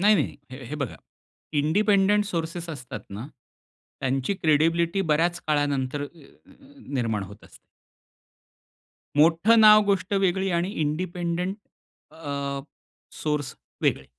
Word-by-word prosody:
नाही 210 Hz, +2 st, +6 dB
नाही, 155 Hz, -, 0 dB
हे 130 Hz, 0 st, -9 dB
हे 150 Hz, -, -6 dB
बघा, 140 Hz, -5 st, -4 dB, 0.6 s
इंडिपेंडंट 200 Hz, +6 st, +3 dB
सोर्सेस 170 Hz, -2 st, -4 dB
असतात 125 Hz, -7 st, -7 dB
ना, 105 Hz, +6 st, -6 dB, 0.7 s
त्यांची 135 Hz, +7 st, 0 dB
क्रेडिबिलिटी 165 Hz, +3 st, +2 dB
बऱ्याच 170 Hz, +3 st, +2 dB
काळानंतर, 145 Hz, -2 st, 0 dB
अ -, -, -2 dB
अ 170 Hz, -, -17 dB, 0.3 s
निर्माण 115 Hz, -6 st, -1 dB
होत 100 Hz, +2 st, -11 dB
असते. -, -, -17 dB, 1.6 s
मोठं 170 Hz, +9 st, +5 dB
नाव 215 Hz, -1 st, +8 dB
गोष्ट 195 Hz, -1 st, 0 dB
वेगळी 190 Hz, +1 st, +1 dB
आणि 180 Hz, +3 st, -1 dB
इंडिपेन्डन्ट 175 Hz, +4 st, -2 dB, 0.6 s
अ, 140 Hz, -3 st, -4 dB, 0.6 s
सोर्स 150 Hz, -4 st, -1 dB, 0.3 s
वेगळे. 65 Hz, -, +1 dB
160 Hz, 115 wpm, -25 LUFS, 140-185 Hz, 1.6 s, नाव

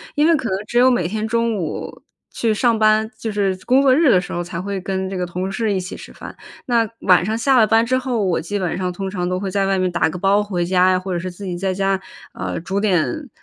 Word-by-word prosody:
因 300 Hz, +1 st, +3 dB
为 335 Hz, -, +5 dB
可 260 Hz, -6 st, -2 dB
能 190 Hz, -, 0 dB
只 240 Hz, -, -2 dB
有 255 Hz, +1 st, +6 dB
每 180 Hz, -9 st, +1 dB
天 215 Hz, +3 st, -3 dB
中 230 Hz, 0 st, 0 dB
午 165 Hz, -5 st, -5 dB, 0.3 s
去 225 Hz, -2 st, 0 dB
上 230 Hz, +1 st, +2 dB
班， 215 Hz, 0 st, +3 dB
就 225 Hz, -, -4 dB
是 200 Hz, -2 st, 0 dB
工 260 Hz, +2 st, +4 dB
作 265 Hz, -2 st, +5 dB
日 305 Hz, -3 st, +4 dB
的 185 Hz, -, +5 dB
时 180 Hz, -, -7 dB
候 175 Hz, -, -2 dB
才 175 Hz, 0 st, -5 dB
会 195 Hz, 0 st, -4 dB
跟 190 Hz, 0 st, -3 dB
这 195 Hz, -, -5 dB
个 180 Hz, -1 st, -2 dB
同 180 Hz, +2 st, -4 dB
事 210 Hz, +2 st, -1 dB
一 190 Hz, -, 0 dB
起 185 Hz, +1 st, -6 dB
吃 -, -, -11 dB
饭。 -, -, -10 dB, 0.3 s
那 235 Hz, -2 st, +2 dB
晚 180 Hz, -2 st, +4 dB
上 220 Hz, +3 st, -1 dB
下 260 Hz, +3 st, +3 dB
了 225 Hz, -, +6 dB
班 225 Hz, +2 st, +3 dB
之 255 Hz, +2 st, +1 dB
后， 250 Hz, -5 st, -1 dB
我 180 Hz, -3 st, 0 dB
基 205 Hz, +5 st, -3 dB
本 180 Hz, -3 st, -2 dB
上 180 Hz, -1 st, -2 dB
通 190 Hz, +2 st, -5 dB
常 180 Hz, -2 st, -3 dB
都 180 Hz, 0 st, -1 dB
会 195 Hz, 0 st, -3 dB
在 195 Hz, +1 st, 0 dB
外 195 Hz, -1 st, +1 dB
面 185 Hz, 0 st, +1 dB
打 175 Hz, -2 st, +1 dB
个 180 Hz, -, -6 dB
包 200 Hz, +3 st, +3 dB
回 180 Hz, -4 st, -2 dB
家 185 Hz, +1 st, +3 dB
呀， 185 Hz, -, +2 dB
或 185 Hz, 0 st, -5 dB
者 175 Hz, -, -1 dB
是 185 Hz, +1 st, -5 dB
自 195 Hz, +3 st, -10 dB
己 180 Hz, -2 st, -4 dB
在 190 Hz, +1 st, -1 dB
家， 195 Hz, 0 st, 0 dB, 0.3 s
啊， -, -, -4 dB
煮 190 Hz, +4 st, -2 dB
点， 215 Hz, -, 0 dB
195 Hz, 300 characters per minute, -20 LUFS, 185-225 Hz, 0.3 s, 有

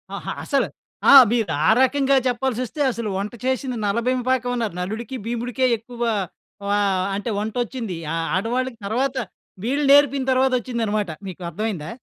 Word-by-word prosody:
ఆహా! -, -, -5 dB
అసలు -, -, +1 dB, 0.4 s
ఆ! -, -, +9 dB, 0.2 s
మీరు 225 Hz, -7 st, +1 dB
ఆ -, -, +5 dB
రకంగా 275 Hz, +1 st, +3 dB
చెప్పాల్సొస్తే 255 Hz, +2 st, -2 dB
అసలు 230 Hz, -2 st, -4 dB
వంట 200 Hz, +3 st, -4 dB
చేసింది 260 Hz, -1 st, -1 dB
నలబీమ 235 Hz, +5 st, 0 dB
పాకమన్నారు. 245 Hz, -5 st, 0 dB
నలుడికి 220 Hz, +7 st, -4 dB
భీముడికే 240 Hz, +2 st, -1 dB
ఎక్కువ 235 Hz, +2 st, -12 dB, 0.7 s
వ -, -, +1 dB, 0.4 s
అంటే 205 Hz, +4 st, -3 dB
వంటొచ్చింది. 225 Hz, -1 st, -3 dB, 0.2 s
ఆహ్, 165 Hz, 0 st, -1 dB
ఆడవాళ్ళకి 240 Hz, +5 st, -1 dB
తరువాత, 255 Hz, +6 st, -1 dB, 0.5 s
వీళ్ళు 280 Hz, +5 st, 0 dB
నేర్పిన 280 Hz, -1 st, +5 dB
తరువాతొచ్చిందనమాట. 235 Hz, -6 st, 0 dB, 0.2 s
మీకు 185 Hz, -1 st, -8 dB
అర్థమైందా? 190 Hz, -5 st, -4 dB
240 Hz, 130 wpm, -22 LUFS, 215-260 Hz, 0.7 s, ఆ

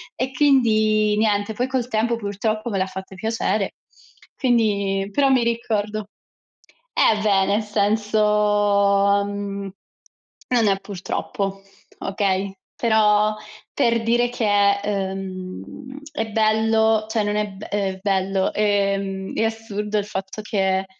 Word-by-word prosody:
E 255 Hz, +1 st, -2 dB
quindi 215 Hz, -6 st, +3 dB
niente, 210 Hz, 0 st, +1 dB
poi 250 Hz, +4 st, -1 dB
col 255 Hz, -2 st, -1 dB
tempo 235 Hz, 0 st, 0 dB
purtroppo 215 Hz, +2 st, -2 dB
me 200 Hz, -, -2 dB
l'ha 185 Hz, -, +1 dB
fatto 190 Hz, 0 st, -8 dB
piacere; 215 Hz, -1 st, -1 dB, 0.6 s
quindi 200 Hz, -6 st, +1 dB
però 275 Hz, +4 st, +3 dB
mi 255 Hz, -3 st, +4 dB
ricordo 215 Hz, -3 st, -2 dB, 0.8 s
eh, 215 Hz, -, +4 dB
beh, 195 Hz, -2 st, +3 dB
nel 205 Hz, +3 st, +1 dB
senso, 205 Hz, -1 st, +2 dB
mhmm, 200 Hz, -1 st, -5 dB, 0.8 s
non 235 Hz, -4 st, +3 dB
è 195 Hz, -1 st, +3 dB
purtroppo, 195 Hz, 0 st, -4 dB, 0.4 s
okay, 195 Hz, -1 st, -1 dB, 0.2 s
però 215 Hz, -2 st, +3 dB, 0.4 s
per 230 Hz, -1 st, +2 dB
dire 240 Hz, +1 st, +2 dB
che, 205 Hz, -4 st, +2 dB
ehm, 195 Hz, +6 st, -5 dB
è 220 Hz, 0 st, -3 dB
bello 220 Hz, 0 st, +2 dB
cioè 220 Hz, -2 st, 0 dB
non 205 Hz, 0 st, -1 dB
è 210 Hz, 0 st, 0 dB
be 195 Hz, +2 st, -10 dB
ehm, 195 Hz, -2 st, -2 dB
bello, 195 Hz, -1 st, 0 dB
ehm, 195 Hz, -2 st, 0 dB
è 225 Hz, -, +1 dB
assurdo 215 Hz, -2 st, -2 dB
il 205 Hz, -, 0 dB
fatto 195 Hz, +1 st, -5 dB
che 190 Hz, -2 st, 0 dB
210 Hz, 125 wpm, -22 LUFS, 195-220 Hz, 0.8 s, mi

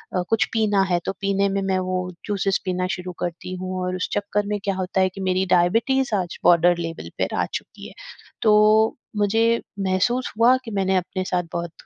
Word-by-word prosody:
अ, 180 Hz, -, +2 dB
कुछ 225 Hz, -1 st, +3 dB
पीना 210 Hz, -3 st, +2 dB
है, 175 Hz, -, +3 dB
तो -, -, 0 dB
पीने 200 Hz, 0 st, +1 dB
में 195 Hz, 0 st, -1 dB
मैं 190 Hz, -1 st, 0 dB
वो 185 Hz, 0 st, -1 dB, 0.3 s
जूसेज़ 195 Hz, -2 st, 0 dB
पीना 185 Hz, -1 st, -1 dB
शुरू 180 Hz, 0 st, -7 dB
करती 175 Hz, +1 st, -4 dB
हूँ। 185 Hz, 0 st, -4 dB
और 180 Hz, 0 st, -2 dB
उस 185 Hz, -, -3 dB
चक्कर 205 Hz, 0 st, -1 dB
में 205 Hz, 0 st, -1 dB
क्या 195 Hz, -1 st, -1 dB
होता 185 Hz, 0 st, -1 dB
है 190 Hz, -, +3 dB
कि 195 Hz, +1 st, -9 dB
मेरी 185 Hz, 0 st, +1 dB
डायबिटीज 230 Hz, +9 st, +2 dB
आज 175 Hz, -1 st, -7 dB
बॉर्डर 175 Hz, 0 st, +5 dB
लेवल 165 Hz, -1 st, -5 dB
पे -, -, +1 dB
आ -, -, +1 dB
चुकी -, -, -7 dB
है। -, -, -13 dB, 0.5 s
तो 215 Hz, 0 st, +4 dB, 0.2 s
मुझे 225 Hz, +3 st, +2 dB, 0.2 s
महसूस 200 Hz, +7 st, 0 dB
हुआ 240 Hz, +3 st, +6 dB
कि 225 Hz, -, -6 dB
मैंने 190 Hz, -2 st, +1 dB
अपने 185 Hz, +1 st, -3 dB
साथ 180 Hz, -1 st, 0 dB
बहुत 170 Hz, -1 st, -3 dB
190 Hz, 200 wpm, -23 LUFS, 185-210 Hz, 0.5 s, हुआ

